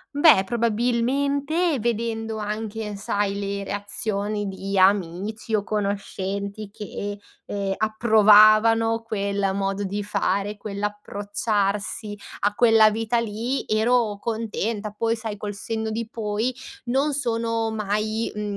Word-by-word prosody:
Beh, 290 - +6
probabilmente, 265 - +1
vedendo 225 -1 -2
anche 215 0 -4
sai 200 0 -1
le 200 0 -3
reazioni 205 +1 -2
di 195 0 -4
amici 200 +3 +1
o 205 -2 +2
conoscenti 200 0 -3
che, 205 -1 -6 0.3
ehm, 195 -1 -2
approvavano 220 +1 +5
quel 200 -3 -1
modo 195 +1 -1
di 200 +2 -2
fare, 200 0 -1
quell'approcciarsi 205 0 -2 0.2
a 205 +1 +1
quella 225 -2 +6
vita 225 +2 0
lì, 230 +4 -2
ero 220 -1 +2
contenta. 220 -1 -3
Poi, 230 +2 0
sai, 220 -2 -5
col 205 0 -5
senno 220 +2 -3
di 225 0 -3
poi, 220 +3 -2 0.3
non 275 +4 +1
sono 230 -4 0
mai, 215 +1 -1
mhmm, 210 0 -4
215 Hz, 115 wpm, -24 LUFS, 205-230 Hz, 0.3 s, Beh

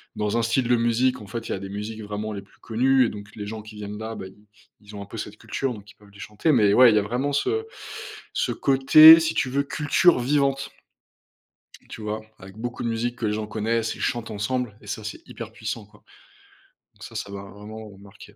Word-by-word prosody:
dans 105 +2 -1
un - - +2
style 120 +2 +1
de 125 - +4
musique, 120 +1 +1
en 100 - -11
fait, 115 +2 -6
il - - -1
y - - -1
a 95 - -6
des 95 - -7
musiques 105 +2 -6
vraiment 105 +1 -4
les 100 - -5
plus 100 - -25
connues. 130 +3 +3
Et - - -3
donc, 100 0 -9
les 105 - -6
gens 110 +1 -6
qui 110 0 -12
viennent 105 0 -6
là, 110 +1 -5
bah, - - -7
ils 105 +2 -18 0.4
ils 105 0 -13
ont 100 - -6
un - - -11
peu 100 - -10
cette 105 0 -6
culture, 135 -2 -3
donc 105 -2 -12
ils - - -23
peuvent 105 -1 -20
les 100 - -16
chanter. 105 +10 -1
Mais 105 -5 +4
ouais, 125 +1 +8
il - - +2
y 105 - +5
a - - -1
vraiment 125 +7 -1
ce 440 - 0 0.7
ce - - 0
côté, 155 +4 +8
si 160 - 0
tu 130 - +1
veux 140 +2 +1
culture 150 +3 +3
vivante, 135 +1 +1 1.2
tu - - -8
vois? 105 +1 -3 0.2
Avec 95 +1 -12
beaucoup 120 +2 -5
de 120 - -1
musiques 120 +2 -2
que 120 - -3
les 105 - 0
gens 105 0 -3
connaissent 110 +1 -1
et - - -13
chantent 120 -3 -2
ensemble 105 +1 -2
et - - -16
ça, 110 +2 -5
c'est 105 - -6
hyper 115 -1 -8
puissant 110 -1 -5
quoi. 105 0 -23 0.9
Donc - - -15
ça - - -12
ça 100 - -5
m'a 100 0 -7
vraiment 105 +2 -10
marqué. 100 +2 -15
110 Hz, 245 wpm, -24 LUFS, 105-125 Hz, 1.2 s, ouais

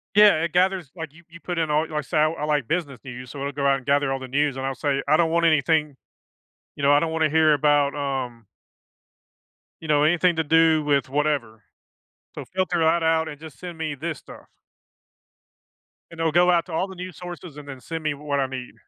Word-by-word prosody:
Yeah, 205 -6 +6
it 170 - -3
gathers 180 -4 +1
like, 160 -4 -7
you 170 +3 -18
you 170 +1 -13
put 175 0 -5
in 160 -2 0
all 155 +2 +1
like, 150 -1 -3
say, 145 - -3
I 155 +1 +4
I 155 -2 -4
like 145 -5 0
business 155 -7 -2
news, 125 -1 -9
so 140 - -8
it'll 140 +1 -3
go 140 0 -3
out 135 0 +4
and 130 - -12
gather 140 -1 +2
all 135 - -2
the 130 - -7
news, 140 +1 0
and 135 - -3
I'll 135 0 -2
say, 140 -1 -1
"I 155 +2 +4
don't 165 -1 +2
want 170 0 +2
anything 155 -1 +2 0.8
you - - -6
know, 140 +1 +5
I 145 - +5
don't 160 0 -1
wanna 160 -1 +1
hear 155 0 +4
about, 145 -1 +2
um" 130 -5 -4 1.4
you 160 - -8
know, 150 -1 +3
“Anything 175 +2 +3
to 160 - +1
do 160 0 +4
with 140 -3 +1
whatever, 135 -7 -1 0.7
so - - -7
filter 185 -2 -1
that 165 +1 +2
out 160 0 +2
and 145 -2 -8
just 160 -2 -12
send 175 -2 -8
me 155 -2 -3
this 155 0 -5
stuff.” - - -14 1.6
And 165 - -12
it'll 165 -1 +1
go 175 +2 +4
out 170 -1 +2
to 175 - -8
all 185 +4 0
the 190 - -10
news 180 -1 -8
sources 175 -3 -9
and 145 -1 -10
then 135 -2 -8
send 165 +4 -6
me 155 -1 0
what 145 0 -3
I 135 - +1
need. 130 -1 -7
155 Hz, 230 wpm, -24 LUFS, 140-165 Hz, 1.6 s, Yeah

